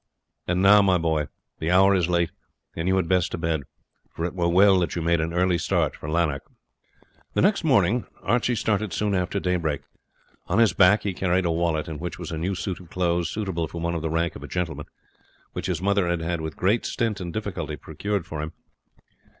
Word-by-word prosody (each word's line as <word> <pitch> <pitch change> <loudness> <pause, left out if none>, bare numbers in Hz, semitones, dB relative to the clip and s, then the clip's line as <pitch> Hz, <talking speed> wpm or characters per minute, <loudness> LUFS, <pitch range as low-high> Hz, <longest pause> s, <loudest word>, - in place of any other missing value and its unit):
And 90 +2 +1
now, 105 +1 +8
my 95 -2 +4
boy, 80 -3 0 0.3
the 80 - -2
hour 95 +2 +5
is 90 -3 +1
late, 85 -2 +1 0.4
and 80 +1 -2
you 95 - +3
had 95 -3 +1
best 90 -1 +2
to - - -1
bed, 80 -2 -1 0.5
for 80 - -4
it 90 - -3
were 85 -2 0
well 95 +2 +6
that 85 -3 -1
you 85 - -2
made 85 0 +2
an 80 +1 -2
early 90 0 +2
start 85 -4 0
for 75 - -7
Lanark." 80 -4 +1 0.9
The - - +3
next 200 0 +3
morning 120 - +3 0.2
Archie 120 +3 +1
started 105 -4 0
soon 100 +4 0
after 90 +1 0
daybreak. 85 -6 -1 0.7
On - - 0
his 115 -5 +5
back 100 +3 +5
he 100 - -1
carried 90 0 +1
a 85 - +2
wallet, 80 -2 0
in 80 -2 -6
which 85 +1 -5
was 85 -2 -6
a 80 - -3
new 95 +4 -1
suit 90 +1 -4
of 90 -2 -14
clothes 85 -2 0
suitable 95 -6 -2
for 85 - -7
one 85 +1 -1
of 85 - -2
the 80 - -2
rank 85 +1 0
of - - -9
a - - -7
gentleman, 80 -5 -3 0.7
which - - -4
his 90 -1 -2
mother 100 -2 +2
had 85 0 -2
with 80 -3 -5
great 105 +6 +2
stint 110 -4 -1
and 85 -1 -4
difficulty 90 -7 -4
procured 100 +4 -3
for 80 -2 -5
him. 80 +1 -5
90 Hz, 215 wpm, -25 LUFS, 80-95 Hz, 0.9 s, now